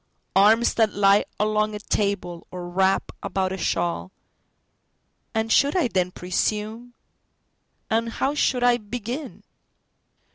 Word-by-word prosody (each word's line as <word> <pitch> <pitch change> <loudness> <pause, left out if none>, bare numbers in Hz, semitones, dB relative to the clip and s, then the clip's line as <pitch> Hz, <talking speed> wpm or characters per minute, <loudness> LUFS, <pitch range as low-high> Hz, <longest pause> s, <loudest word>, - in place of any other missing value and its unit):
Arms 220 +4 +5
that 220 -2 +2
lie 200 0 +4
along 215 0 +1
a - - -5
table, 200 -5 -2
or 180 -1 -7
wrap 190 +2 +1
about 190 -1 -1
a 190 - -3
shawl. 85 - -1 1.2
And 225 0 0
should 285 +6 +4
I 305 -9 +2
then 185 -4 0
presume? 215 +6 -3 0.9
And 230 +1 0
how 275 +2 0
should 260 -4 +1
I 245 -1 +5
begin? 245 +5 -6
210 Hz, 120 wpm, -24 LUFS, 190-235 Hz, 1.2 s, Arms